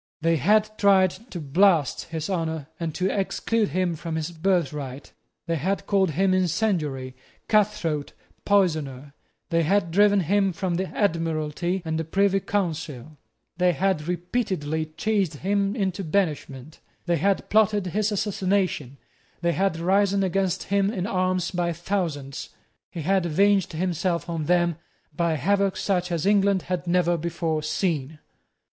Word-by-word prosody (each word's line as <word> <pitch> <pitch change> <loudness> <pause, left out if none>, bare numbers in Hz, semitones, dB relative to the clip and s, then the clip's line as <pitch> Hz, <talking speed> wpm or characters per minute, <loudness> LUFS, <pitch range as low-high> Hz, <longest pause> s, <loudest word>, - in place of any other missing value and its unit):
They 165 0 +2
had 215 - +2
tried 190 -2 +5 0.2
to 175 - -6
blast 160 0 +2
his 160 -1 -4
honour 160 -5 -2
and 165 -3 -3
to 185 - 0
exclude 210 +2 0
him 180 -2 0
from 160 +1 -5
his 160 +1 -3
birthright; 150 -6 -2 0.3
they 165 -1 -1
had 190 +7 -1
called 195 -3 +2
him 185 +5 +2
incendiary, 165 - 0 0.3
cutthroat, 195 -9 +1 0.3
poisoner; 155 -9 0 0.4
they 165 0 +3
had 170 +1 +1
driven 205 +2 +4
him 195 +2 +1
from 185 +1 -2
the 185 +2 -1
Admiralty 165 -1 -1
and 160 0 -1
the - - -1
Privy 195 +4 +2
Council; 160 -8 -3 0.4
they 180 0 +3
had 175 -2 0
repeatedly 175 -4 -2
chased 190 +1 -1
him 200 +5 0
into 195 -3 -1
banishment; 155 -5 -2 0.3
they 175 -1 +1
had 195 +5 +1
plotted 210 -2 +3
his 210 +4 0
assassination; 190 - -1 0.4
they 170 0 +2
had 190 -2 0
risen 195 +3 +2
against 190 -1 0
him 200 0 +1
in 190 -4 -3
arms 185 -3 0
by 175 -1 0
thousands. 165 -6 -3 0.4
He 165 - -6
had 190 +1 +2
avenged 195 +3 +2
himself 175 +1 -1
on 165 -3 -3
them 175 -1 +2 0.4
by 170 0 +1
havoc 195 +6 +1
such 180 -3 -1
as 170 -1 -1
England 200 -2 +3
had 180 -1 -3
never 175 -1 +2
before 165 -1 -2
seen. 155 -2 -2
180 Hz, 140 wpm, -25 LUFS, 160-195 Hz, 0.4 s, tried